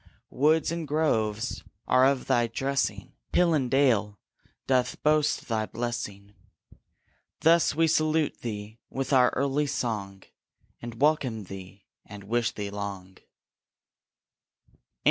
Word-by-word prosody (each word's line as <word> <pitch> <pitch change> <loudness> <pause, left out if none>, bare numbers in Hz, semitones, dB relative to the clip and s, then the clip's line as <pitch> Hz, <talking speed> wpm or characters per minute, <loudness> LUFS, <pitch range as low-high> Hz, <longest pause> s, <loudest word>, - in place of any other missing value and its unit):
Woods 155 +4 +2
and 165 -2 -4
groves 110 -8 0 0.2
are 130 +1 +5
of 135 -2 0
thy 120 -1 +2
dressing, 135 +4 -2 0.2
Hill 175 -2 +4
and 135 -5 +1
dale 115 -7 +2 0.5
doth 130 -2 +1
boast 150 -1 +2
thy 110 -2 -1
blessing. 105 -4 -5 1.1
Thus 165 -2 +4
we 165 +1 +3
salute 155 -1 +1
thee 110 -1 -6
with 135 +1 -3
our 125 -1 +6
early 140 +2 0
song, 100 -7 -3 0.6
And 120 -1 -8
welcome 135 -7 +1
thee, 95 0 -11 0.2
and 105 -1 -11
wish 115 +3 0
thee 100 -1 -6
long. 100 -2 -6
120 Hz, 115 wpm, -27 LUFS, 105-145 Hz, 1.1 s, our